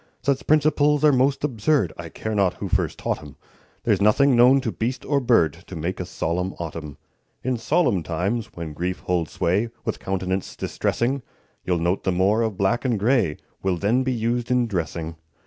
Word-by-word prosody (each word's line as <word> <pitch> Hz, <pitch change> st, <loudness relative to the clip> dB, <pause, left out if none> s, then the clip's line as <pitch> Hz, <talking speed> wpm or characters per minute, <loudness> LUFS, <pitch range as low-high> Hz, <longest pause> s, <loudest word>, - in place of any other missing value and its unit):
Such 140 Hz, -1 st, 0 dB
principles 150 Hz, -1 st, +3 dB
are 150 Hz, -, +7 dB
most 135 Hz, +1 st, +2 dB
absurd, 130 Hz, -, +1 dB
I 85 Hz, -1 st, -8 dB
care 110 Hz, +7 st, -5 dB
not 100 Hz, -3 st, +2 dB
who -, -, -5 dB
first -, -, 0 dB
taught -, -, -2 dB
'em; 75 Hz, -2 st, -12 dB, 0.5 s
There's -, -, +2 dB
nothing 125 Hz, +6 st, +4 dB
known 125 Hz, +3 st, +6 dB
to 120 Hz, -4 st, -2 dB
beast 120 Hz, +5 st, -3 dB
or 140 Hz, -1 st, +2 dB
bird 115 Hz, -, +3 dB
To -, -, -8 dB
make 85 Hz, +4 st, -3 dB
a 90 Hz, -, -4 dB
solemn 90 Hz, +1 st, -2 dB
autumn. 80 Hz, -4 st, -6 dB, 0.5 s
In 130 Hz, 0 st, 0 dB
solemn 125 Hz, -, +2 dB
times, 95 Hz, +8 st, -2 dB
when 80 Hz, -3 st, -6 dB
grief 90 Hz, +4 st, -3 dB
holds 85 Hz, -3 st, -1 dB
sway 100 Hz, +7 st, +1 dB, 0.2 s
With -, -, -2 dB
countenance 95 Hz, 0 st, -2 dB
distressing, 130 Hz, +3 st, -1 dB, 0.4 s
You'll 90 Hz, -1 st, +1 dB
note 85 Hz, +3 st, 0 dB
the 95 Hz, -, +1 dB
more 95 Hz, +5 st, +2 dB
of 110 Hz, -4 st, -1 dB
black 115 Hz, +5 st, +1 dB
and 125 Hz, -4 st, +1 dB
gray 110 Hz, -, +2 dB, 0.2 s
Will 95 Hz, -2 st, 0 dB
then 105 Hz, +8 st, +2 dB
be 130 Hz, 0 st, 0 dB
used 120 Hz, 0 st, -1 dB
in 125 Hz, -1 st, +3 dB
dressing. 85 Hz, -5 st, -3 dB
105 Hz, 185 wpm, -23 LUFS, 90-125 Hz, 0.5 s, are